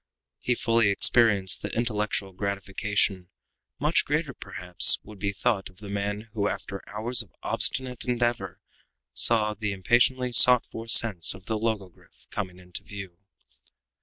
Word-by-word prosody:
He 125 Hz, -, -1 dB
fully 115 Hz, -2 st, +2 dB
experienced 100 Hz, -2 st, +3 dB
the -, -, -5 dB
intellectual 105 Hz, -4 st, -2 dB
gratification 100 Hz, -1 st, -2 dB, 0.5 s
much 150 Hz, +4 st, +1 dB
greater 150 Hz, 0 st, -2 dB
than, -, -, -39 dB
perhaps, 90 Hz, -1 st, +4 dB
would 105 Hz, -2 st, -13 dB
be 100 Hz, 0 st, -2 dB
thought 100 Hz, 0 st, -1 dB
of 90 Hz, -, -22 dB
the 105 Hz, 0 st, -11 dB
man 100 Hz, +1 st, -3 dB
who, 105 Hz, -2 st, -1 dB
after 100 Hz, -1 st, -5 dB
hours 115 Hz, +3 st, +1 dB
of 105 Hz, -, -14 dB
obstinate 130 Hz, -2 st, -2 dB
endeavor, 120 Hz, -7 st, -2 dB, 0.5 s
saw 110 Hz, -, +2 dB
the 105 Hz, 0 st, -4 dB
impatiently 125 Hz, +6 st, +2 dB
sought 125 Hz, 0 st, +7 dB
for 115 Hz, 0 st, -8 dB
sense 110 Hz, -7 st, +3 dB
of 95 Hz, -, -15 dB
the 110 Hz, -, -2 dB
logogryph 100 Hz, -, -6 dB
coming 95 Hz, -4 st, -5 dB
into 90 Hz, +1 st, -9 dB
view. 95 Hz, -3 st, -10 dB
105 Hz, 145 wpm, -26 LUFS, 95-115 Hz, 0.5 s, sought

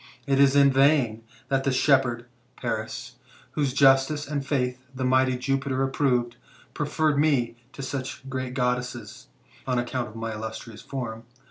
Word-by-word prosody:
It 135 Hz, -1 st, +1 dB
is 140 Hz, 0 st, +5 dB
in 140 Hz, -1 st, +6 dB
vain 135 Hz, -5 st, +3 dB, 0.3 s
that 135 Hz, -1 st, +1 dB
the 135 Hz, -, +1 dB
shepherd 130 Hz, -3 st, +2 dB, 0.3 s
[Paris], 110 Hz, -3 st, -4 dB, 0.3 s
whose 145 Hz, -3 st, 0 dB
justice 135 Hz, +2 st, +4 dB
and 145 Hz, -1 st, -2 dB
faith 130 Hz, -3 st, -1 dB, 0.2 s
the 130 Hz, 0 st, -2 dB
mighty 130 Hz, 0 st, +3 dB
Jupiter 135 Hz, +1 st, -1 dB
approved, 125 Hz, -3 st, 0 dB, 0.4 s
preferred 155 Hz, -2 st, 0 dB
me 140 Hz, -6 st, +2 dB, 0.2 s
to 140 Hz, -, -7 dB
such 130 Hz, 0 st, -5 dB
great 130 Hz, -1 st, -4 dB
Goddesses^^, 125 Hz, -1 st, -2 dB, 0.4 s
on 130 Hz, -1 st, +1 dB
account 120 Hz, 0 st, -2 dB
of 110 Hz, -, -13 dB
my 115 Hz, 0 st, -4 dB
illustrious 110 Hz, +1 st, -7 dB
form. 115 Hz, -4 st, -6 dB
130 Hz, 145 wpm, -26 LUFS, 120-140 Hz, 0.4 s, in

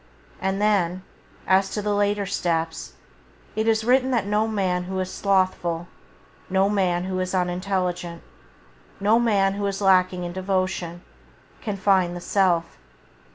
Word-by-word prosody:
And 190 Hz, +1 st, -1 dB
then, 190 Hz, -4 st, +1 dB, 0.4 s
as 190 Hz, +1 st, +3 dB
to 210 Hz, -, -2 dB
the 210 Hz, 0 st, 0 dB
later 205 Hz, 0 st, +1 dB
steps, 165 Hz, -4 st, -2 dB, 0.6 s
it 220 Hz, +1 st, 0 dB
is 220 Hz, 0 st, +2 dB
written 255 Hz, +2 st, +3 dB
that 235 Hz, -6 st, +1 dB
no 210 Hz, +2 st, +1 dB
man 185 Hz, -4 st, -1 dB
who 190 Hz, +1 st, -3 dB
is 185 Hz, 0 st, -3 dB
slothful, 185 Hz, -3 st, 0 dB, 0.6 s
no 190 Hz, +1 st, +2 dB
man 185 Hz, -4 st, +1 dB
who 185 Hz, 0 st, -3 dB
is 185 Hz, +1 st, -2 dB
unintelligent, 180 Hz, -1 st, -2 dB, 0.8 s
no 210 Hz, +4 st, +4 dB
man 200 Hz, -5 st, +2 dB
who 200 Hz, 0 st, -3 dB
is 195 Hz, -1 st, -3 dB
lacking 185 Hz, -2 st, +3 dB
in 175 Hz, 0 st, -5 dB
devotion, 185 Hz, -2 st, -2 dB, 0.6 s
can 210 Hz, -4 st, -3 dB
find 185 Hz, -2 st, +2 dB
the -, -, -5 dB
Self. 175 Hz, -2 st, +1 dB
190 Hz, 145 wpm, -24 LUFS, 180-205 Hz, 0.8 s, no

